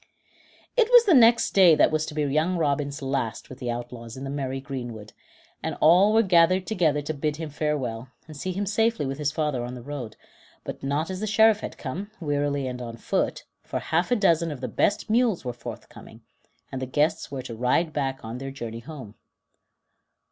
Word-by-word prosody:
It 475 -2 +3
was 485 -1 +8
the 385 - +5
next 230 -3 +6
day 180 -5 +7
that - - +4
was 155 0 0
to 150 - -7
be 150 - 0
young 155 +6 +1
Robin's 145 -2 -1
last 135 -4 -3
with 130 - -10
the 125 - -4
outlaws 120 0 -6
in 130 - -7
the 135 - -4
merry 135 -2 -3
greenwood, 120 -6 -7 0.5
and - - -4
all 180 +6 +6
were 225 +1 +4
gathered 185 0 +4
together 155 -8 +1
to 155 - -3
bid 150 0 -2
him 155 -1 -6
farewell, 135 -6 -2 0.2
and 155 - -11
see 185 +6 -4
him 195 +3 -2
safely 220 -2 +1
with 135 +2 -4
his 145 -1 0
father 150 -5 -1
on 125 +1 -6
the 120 - -9
road; 125 -6 -6 0.5
but - - -7
not 145 +6 -1
as 185 - -4
the 215 - -3
Sheriff 220 +1 +5
had - - -7
come, 170 +10 -5
wearily 145 -3 -1
and 125 -1 -5
on 115 -1 -7
foot, - - -1 0.2
for - - -5
half 170 +3 0
a 245 - +3
dozen 170 -6 +2
of 145 -4 -6
the 130 - -4
best 205 - 0
mules 225 - +1
were 125 - -3
forthcoming, 120 - -10 0.5
and 130 - -5
the 130 - -3
guests 150 +4 0
were 135 -2 -5
to 125 - -7
ride 125 +8 +1
back 135 -4 -2
on 115 +3 -6
their 135 0 -5
journey 115 -4 -6
home. 130 -5 -10
145 Hz, 205 wpm, -25 LUFS, 130-180 Hz, 0.5 s, was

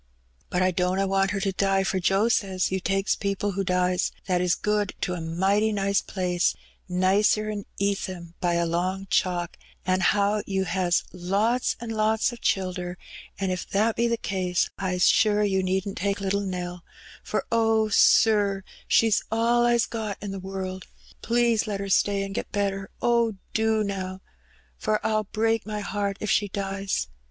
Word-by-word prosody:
But 180 +1 +1
I 185 - +3
dunna 185 +2 +1
want 195 0 +1
her 200 0 -1
to 195 -1 0
die, 195 0 +1
for 190 0 0
Joe 195 +4 +2
says 190 -6 0
You 190 - 0
takes 195 +2 0
people 200 0 -2
who 195 +1 -2
dies 180 0 +1
that 180 -2 +1
is 180 -1 +2
good 210 -1 -1
to 180 - -1
a 175 - -4
mighty 190 +6 +1
nice 200 -1 +1
place; 180 -2 0 0.3
nicer^n 205 +3 +2
Eastham 185 -4 -2
by 175 -1 +1
a 170 0 +1
long 185 +3 -1
chalk, 175 -1 0 0.3
an' 185 0 +2
how 205 +3 +2
You 190 -1 0
has 180 -2 +1
lots 200 +7 0
an' 235 -1 -6
lots 220 +1 +1
o' - - -8
childer; 185 -4 -1 0.4
an' 190 -1 0
if 185 - -4
that 215 +3 +1
be 235 - +2
the 235 0 0
case, 185 -4 -1
I's 180 -2 +1
sure 210 -1 +4
You 190 -2 +1
needn't 190 +1 -2
take 200 +2 -1
little 200 0 0
Nell; 180 -2 -5 0.4
for - - -2
oh, 225 -1 +3
Sir, 205 -2 +4 0.2
she's 225 -2 +4
all 235 +2 +3
I's 235 -1 +3
got 220 -3 -4
in 200 -1 -5
the 195 - -5
world. 190 0 -5 0.3
Please 235 -1 +2
let 205 -2 -2
her 200 0 -4
stay 200 +1 +2
an' 195 0 -5
get - - -4
better. 195 -1 -1
Oh, 235 -2 +2 0.2
do 220 -1 +2
now! 190 -2 -4 0.6
for 215 0 +1
Pll 215 -1 +1
break 225 0 0
my 210 -1 -3
heart 200 -1 -2
if 215 - -1
she 205 - +2
dies. 195 - -2
195 Hz, 175 wpm, -25 LUFS, 185-215 Hz, 0.6 s, sure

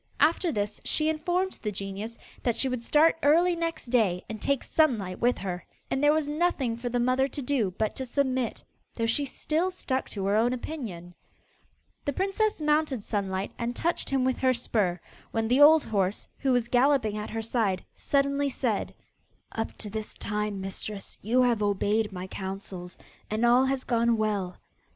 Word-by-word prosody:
After 330 +2 +3
this 205 -3 -3
she 310 0 +2
informed 355 +4 -1
the 210 - -2
genius 200 +3 -5 0.2
that 240 -2 +1
she 270 - +3
would 255 -2 -2
start 310 +6 +4
early 340 +5 +4
next 330 -7 -3
day 195 -8 +2
and 220 -1 -7
take 280 -2 +1
Sunlight 220 - +1
with 245 +1 +2
her. 180 -2 -4 0.3
And 270 - 0
there 290 - +6
was 310 -1 +1
nothing 295 -6 0
for 240 +1 -4
the 245 0 0
mother 255 +2 +2
to 280 - -4
do 240 -9 0
but 215 -1 0
to 265 - -3
submit, 260 -2 -1 0.3
though 230 - 0
she 255 +6 +1
still 320 +6 -1
stuck 265 -8 -2
to 195 -2 -4
her 200 +1 +2
own 235 +3 +3
opinion. 220 - -6 0.9
The 285 - -1
princess 395 +5 0
mounted 300 -6 +1
Sunlight, 195 -2 -2
and 235 +1 -2
touched 340 +6 -1
him 270 -2 +1
with 260 -1 0
her 260 -1 +3
spur, 205 -7 0 0.3
when 225 -1 -1
the 250 +5 +3
old 310 +1 +8
horse, 200 -2 -1
who 270 - +1
was 245 -2 +2
galloping 245 -3 +3
at 210 0 -4
her 225 0 -3
side, 220 -5 0
suddenly 280 0 +1
said: - - -2 0.6
'Up 225 - -3
to 215 - -6
this 215 0 -5
time, 210 -1 -2
mistress, 195 +1 -5
you 245 +5 +3
have 240 -3 +2
obeyed 205 +1 +1
my 180 -1 -5
counsels 190 -1 -6 0.3
and 220 +3 +1
all 245 +2 +5
has 265 0 -1
gone 235 -1 +2
well. 205 -4 -1
240 Hz, 180 wpm, -28 LUFS, 210-280 Hz, 0.9 s, old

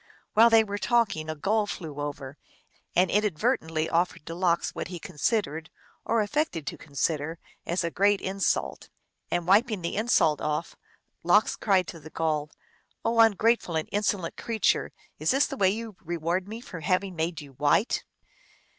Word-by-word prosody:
While 230 +2 +7
they 225 -1 +6
were 205 -1 -4
talking 205 -11 +1
a 155 - -2
gull 205 +7 +1
flew 155 -7 -6
over, 145 -2 -5 0.6
and 180 0 +3
inadvertently 160 -5 0
offered 170 -2 0
to 165 - -6
Lox 170 -1 +1
what - - -4
he 180 0 -6
considered, 165 -3 -2 0.4
or 225 0 +2
affected 210 - -1
to - - -4
consider, 155 +2 -2 0.3
as 175 +1 0
a 170 - -2
great 200 +2 +3
insult. 195 0 -1 0.4
And 175 -1 -1
wiping 205 +1 +3
the 170 - -2
insult 210 -8 +2
off, 150 +2 -2 0.5
Lox 190 +5 +3
cried 190 -4 +2
to 165 - -8
the 155 +1 -11
Gull, 155 -2 -1 0.3
" - - -41
Oh, 230 0 +1
ungrateful 225 -4 +4
and 160 - -1
insolent 200 -4 -1
creature, 225 -2 0 0.3
is - - 0
this 270 +2 +4
the 275 - -5
way 195 -7 +3
you 220 +1 -4
reward 170 +2 -2
me 225 +3 -7
for 180 -8 -8
having 185 +3 0
made 165 0 -2
you 145 -3 -11
white 145 - +1
180 Hz, 165 wpm, -27 LUFS, 160-210 Hz, 0.6 s, While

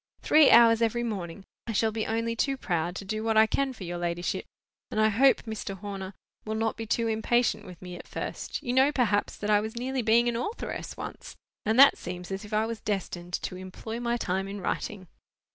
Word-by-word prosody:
Three 305 -2 +6
hours 230 -1 +7
every 230 +1 +1
morning! 195 -4 -5 0.2
I 225 - -2
shall 220 +1 +2
be 220 0 -2
only 230 +1 -1
too 270 +4 0
proud 175 -6 -1
to 195 - -6
do 215 +2 -3
what 225 -1 +1
I 220 - +8
can 275 +4 0
for 230 -6 -9
your 175 0 -4
ladyship; 175 0 -2 0.4
and 215 - -2
I 215 0 +5
hope 260 +6 +4
Mr. 215 -3 -5
Horner 195 -1 -6 0.3
will 215 0 -3
not 225 0 0
be 225 -1 -6
too 230 +2 +1
impatient 220 -1 +1
with 180 -2 -11
me 180 -1 -7
at - - -11
first. - - -5
You 245 - -1
know, 265 +3 +5
perhaps, 225 -7 +1
that 210 0 -1
I 205 0 +5
was 220 +2 -5
nearly 260 +2 -1
being 235 +1 +4
an 240 - 0
authoress 330 - -4
once, - - -8 0.3
and 220 +2 +2
that 275 - +8
seems 180 +1 -7
as 195 +2 -4
if 210 - -11
I 215 +1 +2
was 225 -2 -5
destined 180 -4 -4
to - - -4
'employ 190 +5 -7
my 240 0 0
time 190 -3 -2
in 200 +1 -6
writing. 190 0 -3
220 Hz, 220 wpm, -28 LUFS, 195-235 Hz, 0.4 s, I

